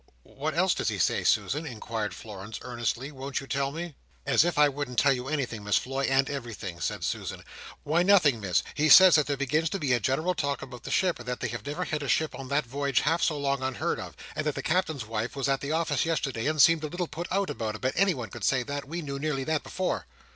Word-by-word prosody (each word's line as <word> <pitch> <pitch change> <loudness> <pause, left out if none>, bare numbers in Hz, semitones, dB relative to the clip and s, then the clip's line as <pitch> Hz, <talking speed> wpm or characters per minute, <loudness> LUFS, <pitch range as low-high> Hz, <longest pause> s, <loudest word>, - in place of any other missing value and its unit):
"What - - -4
else - - +3
does - - -2
he - - -3
say, - - +1
Susan?" 150 +3 +1
inquired 110 -3 -4
Florence, 105 0 -8
earnestly. 120 +2 -3
"Won't 135 0 -4
you 135 - -8
tell 135 0 -1
me?" 165 +2 -5 0.3
"As 140 +2 +4
if 175 -2 -1
I 150 0 +7
wouldn't 140 -3 -4
tell 140 -1 +5
you 125 0 -4
anything, 130 -7 -2
Miss 105 0 +2
Floy, 135 +1 -1
and 135 0 +3
everything!" 115 -10 -6
said 85 - -3
Susan. - - -3 0.4
"Why, 160 +4 +2
nothing 175 - +5
Miss, 95 -5 +1
he 155 +1 +1
says 185 +3 +10
that 150 -3 +4
there 140 -1 -1
begins 150 +4 +1
to 195 - -2
be 145 -8 0
a 120 - +3
general 155 - 0
talk 140 -4 -2
about 125 -2 -10
the - - -5
ship, 180 -6 +1
and 120 - -10
that 125 0 -3
they - - -2
have 120 -1 -6
never 150 +5 -2
had 155 -1 -2
a 140 - -4
ship 155 +3 +1
on 135 - -7
that 140 +1 +1
voyage 140 +2 0
half 165 +4 +1
so 155 - +1
long 140 -1 0
unheard 130 -1 -1
of, - - -8 0.2
and 155 - -1
that 150 - 0
the - - -4
Captain's 160 -7 0
wife 115 +3 -3
was 140 0 -1
at 135 -1 +1
the 140 - -3
office 160 -4 +1
yesterday, 140 -7 -1
and 155 0 0
seemed 165 -2 +5
a - - -1
little 175 +3 -3
put 170 +4 -6
out 195 +1 +1
about 110 -2 -3
it, - - -9
but 130 0 0
anyone 165 - +1
could - - -8
say 130 -2 +2
that, 140 +2 -5
we 170 +3 -4
knew 140 -1 -4
nearly 140 -2 -1
that 155 0 0
before." 185 0 -3
140 Hz, 255 wpm, -28 LUFS, 125-155 Hz, 0.4 s, says